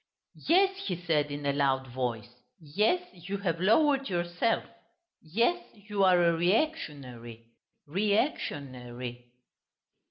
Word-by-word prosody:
"Yes," 385 +3 +3
he 180 - -1
said 155 -4 +1
in 145 0 -5
a 140 - +2
loud 135 -2 +1
voice, 120 -2 -4 0.3
"yes, 210 - +1
you 185 +3 -5
have 180 -4 -2
lowered 275 +6 +3
yourself. 175 +5 0 0.6
Yes, 235 - +1
you 205 -1 -2
are 180 -2 +5
a 170 0 +4
reactionary... 145 - -2 0.3
re 200 +7 0
ac 265 +9 +2
tion 140 -3 -5
ary!" 120 0 -8
175 Hz, 125 wpm, -29 LUFS, 130-210 Hz, 0.6 s, are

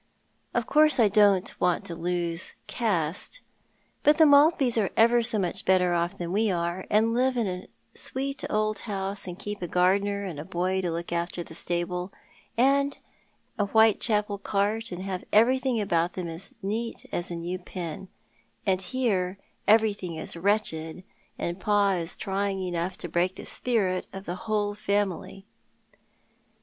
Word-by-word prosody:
Of 240 -1 +1
course, 300 0 +4
I 220 -3 +6
don't 200 -2 +4
want 180 +3 +1
to 175 - -4
lose 170 0 -3
caste, 200 - -2 0.6
but 295 0 +5
the 325 - +7
Maltbys 285 -3 +5
are - - -1
ever 235 +2 +5
so 230 -1 +2
much 185 -4 -1
better 185 -1 +3
otf 170 0 0
than 170 -1 -4
we 215 +3 +2
are, 175 0 -2
and 220 +2 +3
live 255 +1 +2
in 235 - +1
a 180 -1 -4 0.3
sweet 275 +1 -4
old 215 0 0
house, 195 -2 -4
and 180 -1 -6
keep 205 0 -6
a 175 - -2
gardener, 200 +4 +2
and 175 -7 -5
a - - -4
boy 185 +2 -1
to 180 - -1
look 170 +1 -4
after 170 0 -2
the 160 - -12
stable, 175 +2 -2 0.5
and 280 +3 +3 0.6
a 205 - +2
Whitecbapel 210 -1 +3
cart, 210 +3 -1
and 180 +1 -5
have 190 -2 -4
everything 255 +2 +3
about 175 -4 +1
them 180 -2 -4
as 165 +4 -7
neat 225 +4 -3
as 175 - -2
a 175 - -4
new 175 +2 -4
pin, 180 0 -7 0.6
and 190 -2 +2
here 195 -5 0 0.3
everything 205 -5 +3
is 160 - -4
wretched, 170 -3 -1 0.3
and 175 +2 -3
pa 205 0 +3
is 175 -2 -2
trying 195 0 -1
enough 180 0 -2
to 175 - -6
break 175 +3 0
the - - -9
spirit 200 -7 0
of 195 0 -8
the 175 - -3 0.2
whole 205 -1 +1
family." 200 -2 -2
195 Hz, 160 wpm, -27 LUFS, 175-220 Hz, 0.6 s, the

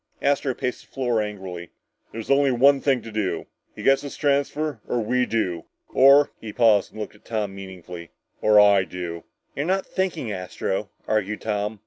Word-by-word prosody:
Astro 140 -2 +1
paced 125 -1 -3
the - - -35
floor 120 -4 0
angrily. 95 -5 -6 0.4
"There's 115 +4 -5
only 140 0 +4
one 135 +3 +4
thing 130 -5 +1
to 115 - -9
do! 105 -3 -2 0.3
He - - -8
gets 135 0 +4
his 140 - -8
transfer 145 -2 0
or 120 - 0
we 125 +3 +1
do! 90 -7 -1 0.3
Or 140 +2 +6
" - - -41
he 110 - -6
paused 110 -4 +3
and - - -11
looked 105 - -5
at 105 - -21
Tom 105 -4 -3
meaningfully, 90 -3 -9 0.3
"or 105 -1 +6
I 100 -2 +6
do." 90 -2 -6 0.3
"You're 145 +4 -2
not 190 +1 +1
thinking, 175 - -2
Astro," 95 +1 -3 0.2
argued 105 -1 -1
Tom. 105 0 -2
110 Hz, 180 wpm, -24 LUFS, 100-135 Hz, 0.4 s, Or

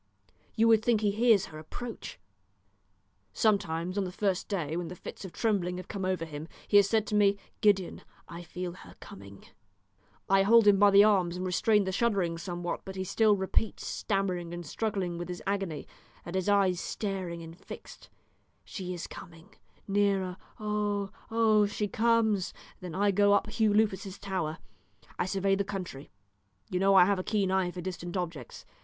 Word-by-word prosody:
You 225 0 +4
would 220 -1 +5
think 230 -3 +2
he 205 -2 +2
hears 220 -1 +4
her 155 - -10
approach. 230 +10 -8 1.1
Sometimes 185 -4 0
on - - +1
the 180 - -4
first 195 -1 -1
day, 165 -7 -2
when 175 0 -3
the 180 - -7
fits - - -9
of 190 - -7
trembling 185 -5 0
have 185 - -8
come 195 -3 -4
over 185 -3 -1
him, 155 0 -7 0.2
he 205 - +5
has 200 -1 +5
said 220 -2 +2
to - - -6
me, 200 -1 +4 0.2
'Gideon, 200 -5 +2 0.3
I 170 0 -8
feel 175 +1 -5
her 90 - -14
coming.' 100 0 -12 0.8
I 195 0 +4
hold 225 +3 +6
him 200 -2 +6
by 205 0 +7
the 200 +1 +7
arms 185 -5 +3
and 185 - -3
restrain 205 +3 +3
the 190 - -2
shuddering 190 -6 0
somewhat, 175 0 -4
but 190 - -8
he 190 - -2
still 215 +3 +3
repeats, 195 +2 -1
stammering 185 -4 -2
and 175 0 -7
struggling 185 -1 -2
with 175 - -5
his 180 - -6
agony, 195 -6 -2 0.4
and 170 - -7
his 190 +1 0
eyes 195 -3 +3
staring 185 -5 -4
and 165 0 -10
fixed, - - -11 0.6
'She 180 -2 -5
is 170 - -6
coming 165 0 -12 0.3
nearer 195 -2 +1 0.2
oh 210 -2 -1 0.2
oh 220 -2 +4
she 205 +1 -2
comes!' 220 -2 +1 0.2
Then 180 -4 -7
I 200 +1 +3
go 205 +1 +4
up 205 +1 +1
Hugh 220 -1 +2
Lupus's 205 -2 0
tower; 185 -6 -3 0.6
I - - 0
survey 195 0 +1
the 195 +1 +1
country. 185 -8 -6 0.6
You 180 - 0
know 195 +1 +4
I 180 -2 +8
have 200 0 +1
a - - -3
keen 200 -3 0
eye 190 -2 +1
for 180 0 -7
distant 175 0 -5
objects. 165 -8 -6
195 Hz, 180 wpm, -29 LUFS, 175-205 Hz, 1.1 s, I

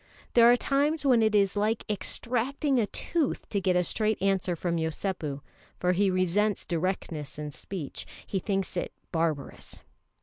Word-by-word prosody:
There 235 0 +7
are 245 - +5
times 285 +4 +1
when 250 -4 +5
it 215 -1 +3
is 200 -1 +3
like 215 +2 0
extracting 250 +6 0
a 215 - +1
tooth 315 - -2
to 200 - 0
get 185 -1 +2
a 180 - +3
straight 215 +4 +1
answer 190 -2 +1
from 170 +1 -1
Yosépu, 160 -3 -3 0.4
for 180 - +2
he 195 +2 +2
resents 185 +3 +1
directness 165 -4 -3
in 150 -1 -5
speech; 160 0 -6 0.2
he 195 - -2
thinks 195 -1 -2
it - - -3 0.2
barbarous. 160 -4 -3
195 Hz, 160 wpm, -28 LUFS, 175-225 Hz, 0.4 s, There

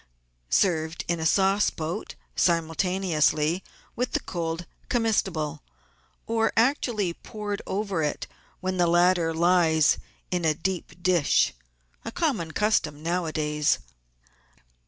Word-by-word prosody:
served 160 - +1
in 170 -1 0
a 160 - +1
sauce 195 +3 +3
boat 160 +1 -5 0.2
simultaneously 165 -1 +1 0.3
with 250 +1 -2
the - - +2
cold 165 0 -4 0.2
comestible, 195 - 0 0.6
or 225 0 +1
actually 225 - +2
poured 205 +2 -5
over 195 -3 -1
it 150 -1 -2 0.4
when 185 0 -2
the 175 -1 +3
latter 175 -1 +3
lies 165 -2 +3 0.3
in 180 -1 0
a 155 -2 +2
deep 180 0 -4
dish 175 -5 +3 0.3
— - - -39
a 225 - -5
common 250 - -1
custom 160 -6 0
nowadays. 155 -3 0
175 Hz, 115 wpm, -26 LUFS, 160-195 Hz, 0.6 s, sauce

